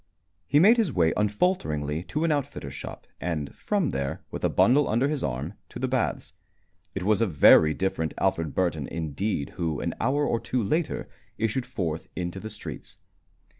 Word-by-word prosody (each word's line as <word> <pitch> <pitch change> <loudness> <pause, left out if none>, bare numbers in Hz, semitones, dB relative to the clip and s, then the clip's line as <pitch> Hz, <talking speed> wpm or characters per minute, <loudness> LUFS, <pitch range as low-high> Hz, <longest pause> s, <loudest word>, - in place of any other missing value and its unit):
He 145 - +4
made 215 +8 +7
his 215 -9 +2
way 85 -7 +2
unfalteringly 100 - 0
to 150 - -2
an 165 - +2
outfitter's 145 -3 -3
shop, - - -8
and 80 -5 -3
from 200 -7 0
there, 70 0 -3
with - - -6
a - - +3
bundle 140 +4 +4
under 120 +5 +2
his 150 -2 -2
arm, 70 +8 -3 0.2
to - - -8
the - - -1
baths. - - -1 0.6
It 95 - -2
was 105 +2 +2
a 115 - +3
very 80 -1 +6
different 95 -4 -1
Alfred 85 -6 0
Burton 80 -7 0
indeed 80 0 -2
who, 80 -4 -1
an - - -2
hour 140 +5 +2
or 115 - +1
two 115 +1 -1
later, 155 - -1 0.3
issued 115 +3 -1
forth 80 -4 -3
into 90 +1 -3
the 110 - -6
streets. 85 - -9
95 Hz, 175 wpm, -26 LUFS, 80-130 Hz, 0.6 s, made